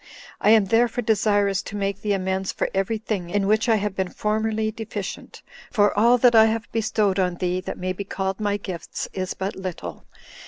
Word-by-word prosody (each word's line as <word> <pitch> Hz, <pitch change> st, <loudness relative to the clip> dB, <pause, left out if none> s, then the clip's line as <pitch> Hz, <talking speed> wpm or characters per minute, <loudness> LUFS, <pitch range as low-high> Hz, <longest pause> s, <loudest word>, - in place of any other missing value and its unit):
I -, -, +3 dB
am 215 Hz, -2 st, +6 dB
therefore 235 Hz, +4 st, +2 dB
desirous 205 Hz, -3 st, +2 dB
to -, -, -8 dB
make 200 Hz, -1 st, -2 dB
thee 210 Hz, -1 st, 0 dB
amends 190 Hz, 0 st, -1 dB
for -, -, -2 dB
every 195 Hz, +3 st, 0 dB
thing 210 Hz, -5 st, -4 dB
in 200 Hz, +2 st, 0 dB
which 215 Hz, +4 st, +2 dB
I 225 Hz, -, +5 dB
have 205 Hz, -2 st, -2 dB
been 190 Hz, -2 st, -1 dB
formerly 215 Hz, +1 st, -1 dB
deficient; 215 Hz, -3 st, -7 dB, 0.3 s
for 205 Hz, -3 st, +2 dB
all 235 Hz, +4 st, +5 dB
that 245 Hz, 0 st, +5 dB
I 220 Hz, -1 st, +8 dB
have 220 Hz, 0 st, 0 dB
bestowed 215 Hz, -3 st, +1 dB
on 180 Hz, -2 st, +1 dB
thee, 180 Hz, +1 st, -1 dB
that -, -, -6 dB
may 185 Hz, 0 st, -2 dB
be 200 Hz, -, -5 dB
called 190 Hz, 0 st, -3 dB
my 205 Hz, -1 st, 0 dB
gifts, 185 Hz, -4 st, -6 dB
is 185 Hz, -1 st, -3 dB
but 190 Hz, +2 st, -3 dB
little. 170 Hz, -, -6 dB
205 Hz, 200 wpm, -23 LUFS, 190-220 Hz, 0.3 s, I